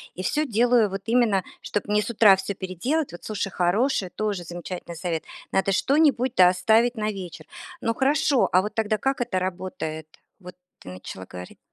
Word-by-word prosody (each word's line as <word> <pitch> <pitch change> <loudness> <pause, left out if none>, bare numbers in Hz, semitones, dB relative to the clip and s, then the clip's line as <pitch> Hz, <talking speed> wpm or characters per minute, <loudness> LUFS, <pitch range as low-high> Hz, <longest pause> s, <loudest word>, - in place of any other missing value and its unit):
И 185 - -5
всё 305 +8 0
делаю 235 -2 +3
вот 195 0 -5
именно, 225 -5 +2 0.2
чтоб 205 - -3
мне 210 0 +2
с 210 - -5
утра 210 -4 +6
всё 195 +1 -4
переделать. 240 - -2
Вот 175 - -10
слушай, 205 -2 -3
хороший, 190 +3 +1
тоже 205 -2 -3
замечательный 175 0 -7
совет. 165 -2 -3 0.3
Надо 195 +1 +2
что-нибудь 270 +1 +2
да 180 -1 +7
оставить 220 +6 +3
на 215 -1 -1
вечер. 180 -5 -8 0.4
Ну 230 - 0
хорошо, 280 +1 +2
а 185 - +5
вот 210 - -5
тогда, 215 -1 0
как 270 +3 -1
это 220 -6 -1
работает? 175 -4 -5 0.3
Вот 180 -1 -11 0.2
ты - - -11
начала 95 0 -9
говорить. 90 0 -10
200 Hz, 180 wpm, -24 LUFS, 180-235 Hz, 0.4 s, да